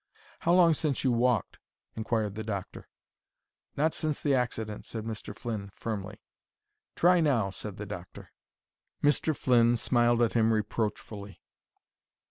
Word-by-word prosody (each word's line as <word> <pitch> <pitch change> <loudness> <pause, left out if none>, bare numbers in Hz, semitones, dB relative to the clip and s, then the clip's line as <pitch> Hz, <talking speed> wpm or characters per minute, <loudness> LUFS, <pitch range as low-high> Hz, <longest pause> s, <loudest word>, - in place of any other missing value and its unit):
"How 170 - +2
long 175 -2 +6
since 150 -3 -1
you 130 - +3
walked?" 120 -4 +1 0.4
inquired 110 -2 -1
the 110 +2 -5
doctor. 100 -4 -5 0.9
"Not 155 +3 +2
since 155 -2 -1
the 145 - +1
accident," 115 -4 -2
said 110 -2 -5
Mr. 110 -2 -6
Flynn, 110 -5 -4
firmly. 105 -2 -5 0.8
"Try 180 +1 +5
now," 120 -11 +2
said 100 +1 -7
the 105 - -5
doctor. 90 -3 -9 0.7
Mr. 145 +1 +2
Flynn 120 -1 +4
smiled 120 0 +3
at 115 - +1
him 115 -1 +3
reproachfully. 105 -1 -3
115 Hz, 130 wpm, -29 LUFS, 105-130 Hz, 0.9 s, long